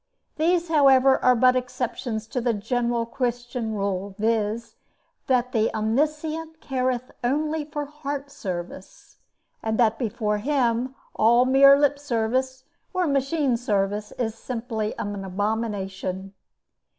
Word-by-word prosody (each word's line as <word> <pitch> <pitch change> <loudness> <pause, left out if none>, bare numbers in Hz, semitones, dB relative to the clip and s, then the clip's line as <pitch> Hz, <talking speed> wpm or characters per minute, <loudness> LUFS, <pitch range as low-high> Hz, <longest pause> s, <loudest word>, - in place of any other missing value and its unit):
These, 340 +2 +2
however, 270 -4 +5
are 250 0 +6
but 255 +2 +5
exceptions 245 -3 -3
to 250 - -2
the 235 -1 +1
general 235 +2 -1
Christian 240 -2 -3
rule, 195 -1 -2
viz.: 225 +1 -1 0.5
that 250 -1 +2
the 225 -3 +1
Omniscient 305 +8 -1
careth 255 -3 -2
only 300 +4 0
for 295 -1 -4
heart 285 -1 -6
service; 185 -4 -7 0.4
and 220 0 -1
that, 225 -2 +3
before 210 -2 -1
Him, 255 0 0 0.2
all 235 +3 +5
mere 275 +2 +7
lip 285 0 +2
service 260 0 -1 0.3
or 365 -1 +2
machine 275 -2 +1
service, 210 -2 -1
is 225 -3 -2
simply 225 -2 -4
an 205 -1 -4
abomination. 195 -1 -3
245 Hz, 120 wpm, -24 LUFS, 220-275 Hz, 0.5 s, mere